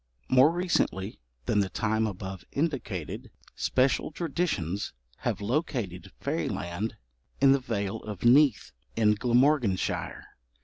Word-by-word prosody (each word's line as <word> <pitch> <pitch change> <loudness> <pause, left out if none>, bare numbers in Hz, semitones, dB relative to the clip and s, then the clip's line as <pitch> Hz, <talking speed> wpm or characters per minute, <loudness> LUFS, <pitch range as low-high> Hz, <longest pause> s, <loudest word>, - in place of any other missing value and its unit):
More 130 +3 +7
recently 170 - -1 0.3
than 105 - +2
the 100 -2 +1
time 110 +1 0
above 95 -2 -6
indicated, 135 - -3 0.2
special 130 +1 +1
traditions 140 - -2 0.2
have - - -2
located 115 - -2
fairyland 85 +7 -2 0.4
in 135 0 +6
the 135 - +4
Vale 100 -6 -2
of 105 -4 -8
Neath, 135 +1 +5 0.2
in 105 -2 +4
Glamorganshire. 120 -2 +1
110 Hz, 105 wpm, -28 LUFS, 100-140 Hz, 0.4 s, More